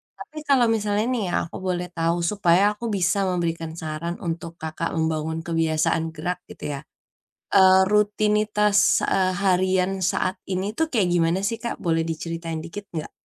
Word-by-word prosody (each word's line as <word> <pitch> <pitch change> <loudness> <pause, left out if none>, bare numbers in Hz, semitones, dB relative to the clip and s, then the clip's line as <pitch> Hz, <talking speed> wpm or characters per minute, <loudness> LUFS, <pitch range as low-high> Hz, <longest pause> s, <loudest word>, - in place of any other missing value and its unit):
Tapi, 310 - -12
kalau 265 -4 +5
misalnya 210 0 0
nih 245 -4 0
iya, 175 - -3
aku 165 - -8
boleh 180 -1 -1
tahu. 165 0 0
Supaya 190 -2 +3
aku 210 +3 -7
bisa 185 +1 +1
memberikan 165 -2 -2
saran 160 +2 -4
untuk 165 0 -4
Kakak, 160 +1 -3
membangun 160 0 -1
kebiasaan 165 -1 +1
gerak 175 +4 -3
gitu - - -12
ya. - - -6 0.8
Eee, 190 -1 +7
rutinitas 210 0 +2 0.3
eee, 185 -1 +2
harian 185 0 +2 0.2
saat 185 - -1 0.2
ini 185 +1 -1
tuh 320 - +2
kayak 200 -6 +3
gimana 170 +1 +2
sih 230 +1 -2
Kak, 235 - -2
boleh 165 -2 +1
diceritain 165 0 -4
dikit 200 +4 -8
enggak? 155 -2 -4
180 Hz, 160 wpm, -24 LUFS, 165-205 Hz, 0.8 s, Eee